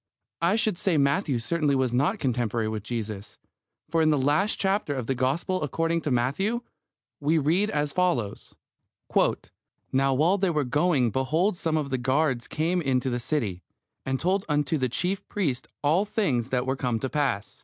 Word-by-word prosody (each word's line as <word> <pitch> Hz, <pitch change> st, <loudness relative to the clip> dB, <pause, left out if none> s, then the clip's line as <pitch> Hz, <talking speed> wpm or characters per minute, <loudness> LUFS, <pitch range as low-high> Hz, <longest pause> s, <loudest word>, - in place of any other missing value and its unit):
I 170 Hz, +4 st, +3 dB
should 215 Hz, -5 st, 0 dB
say 190 Hz, -6 st, +1 dB
Matthew 140 Hz, 0 st, +2 dB
certainly 145 Hz, +4 st, 0 dB
was 130 Hz, -2 st, +1 dB
not 145 Hz, -, +2 dB
contemporary 120 Hz, -, -1 dB
with 110 Hz, -1 st, -3 dB
Jesus, 110 Hz, -2 st, -5 dB, 0.5 s
for 165 Hz, -, +1 dB
in 155 Hz, -, +4 dB
the 150 Hz, -, +3 dB
last 150 Hz, +10 st, +2 dB
chapter 195 Hz, -7 st, 0 dB
of 130 Hz, -3 st, -3 dB
the 135 Hz, -, 0 dB
Gospel 140 Hz, +9 st, 0 dB
according 165 Hz, +3 st, 0 dB
to 150 Hz, -, -2 dB
Matthew 145 Hz, -, 0 dB, 0.6 s
we 150 Hz, +3 st, +2 dB
read 170 Hz, +8 st, +2 dB
as 150 Hz, -5 st, -1 dB
follows: 130 Hz, -, -1 dB, 1.4 s
Now 135 Hz, 0 st, +2 dB
while 170 Hz, +8 st, +3 dB
they 190 Hz, -1 st, +2 dB
were 150 Hz, -3 st, +1 dB
going 140 Hz, -2 st, +2 dB
behold 155 Hz, -, +1 dB
some 160 Hz, -2 st, -1 dB
of 145 Hz, -3 st, -2 dB
the 130 Hz, -, 0 dB
guard 130 Hz, -1 st, 0 dB
came 170 Hz, +3 st, 0 dB
into 130 Hz, -3 st, 0 dB
the 120 Hz, -, -1 dB
city, 115 Hz, -, -2 dB, 0.4 s
and 135 Hz, 0 st, -2 dB
told 190 Hz, +3 st, +1 dB
unto 150 Hz, +1 st, +1 dB
the 130 Hz, -1 st, 0 dB
chief 185 Hz, -, -2 dB
priests 150 Hz, -12 st, -2 dB, 0.2 s
all 160 Hz, +7 st, +3 dB
the 210 Hz, -, -11 dB
things 130 Hz, -, 0 dB
that 125 Hz, -1 st, 0 dB
were 130 Hz, +1 st, 0 dB
come 125 Hz, -3 st, -1 dB
to 135 Hz, -, -2 dB
pass. 135 Hz, -8 st, -2 dB
145 Hz, 180 wpm, -26 LUFS, 125-170 Hz, 1.4 s, in